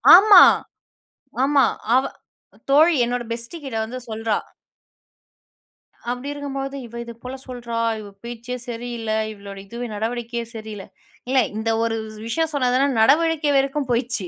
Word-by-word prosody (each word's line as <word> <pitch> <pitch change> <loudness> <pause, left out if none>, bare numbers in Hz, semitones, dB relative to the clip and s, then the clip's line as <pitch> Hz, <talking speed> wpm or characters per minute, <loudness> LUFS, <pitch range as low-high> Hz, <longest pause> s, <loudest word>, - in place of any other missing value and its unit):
ஆமா, 395 -1 +9 1.0
ஆமா 280 -1 +4 0.3
அவ 260 - +4 0.7
தோழி, 315 +5 +6
என்னோட 245 +1 -2
பெஸ்டி 235 +7 -6
கிட்ட 260 -5 -5
வந்து 250 +3 -6
சொல்றா! 220 -1 -1 1.7
அப்டி 250 +3 -5
இருக்கும்போது, 275 -1 -5
இவ 235 0 -12
இது 235 - -9
போல 255 +1 -6
சொல்றா, 240 -2 -6 0.2
இவ 210 - -9 0.2
பேச்சே 240 +1 -6
சரியில்ல, 235 -1 -4 0.2
இவளுடைய 200 -1 -10
இதுவே 235 +3 -5
நடவடிக்கையே 235 +2 -3
சரியில்ல. 215 -3 -7 0.4
இல்ல 265 - +2 0.2
இந்த 220 +1 -1
ஒரு 225 0 0
வ் 215 0 -11
விஷயம் 320 +7 0
சொன்னா 260 -4 +1
தான 275 +1 +2
நடவடிக்கை 305 +4 +3
வரைக்கும் 275 0 0
போயிச்சு. 235 -5 -1
245 Hz, 135 wpm, -22 LUFS, 225-275 Hz, 1.7 s, ஆமா